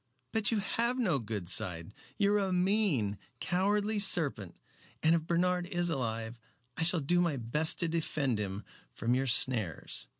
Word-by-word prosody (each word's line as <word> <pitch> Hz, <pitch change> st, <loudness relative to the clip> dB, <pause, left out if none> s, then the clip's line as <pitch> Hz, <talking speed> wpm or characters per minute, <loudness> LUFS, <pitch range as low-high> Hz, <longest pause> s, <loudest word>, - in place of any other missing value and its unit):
But 220 Hz, -1 st, +2 dB
you 225 Hz, -, +1 dB
have 235 Hz, +4 st, 0 dB
no 185 Hz, -, +1 dB
good 105 Hz, -5 st, -5 dB
side. 85 Hz, 0 st, -3 dB, 0.2 s
You 205 Hz, -1 st, +2 dB
are 210 Hz, -, +3 dB
a 195 Hz, -2 st, -1 dB
mean, 180 Hz, -, +1 dB, 0.2 s
cowardly 205 Hz, +4 st, 0 dB
serpent, 145 Hz, -, +2 dB, 0.5 s
and 160 Hz, +1 st, +5 dB
if 165 Hz, -1 st, 0 dB
Bernard 180 Hz, +1 st, +1 dB
is 175 Hz, -2 st, -1 dB
alive 115 Hz, -4 st, -3 dB, 0.4 s
I -, -, -4 dB
shall 165 Hz, 0 st, +4 dB
do 175 Hz, +5 st, +2 dB
my 165 Hz, -5 st, 0 dB
best 140 Hz, +7 st, -1 dB
to 170 Hz, -, +1 dB
defend 150 Hz, -7 st, -1 dB
him 100 Hz, 0 st, -4 dB, 0.3 s
from 115 Hz, +1 st, 0 dB
your 135 Hz, +1 st, 0 dB
snares." 115 Hz, -, +1 dB
160 Hz, 165 wpm, -31 LUFS, 115-185 Hz, 0.5 s, and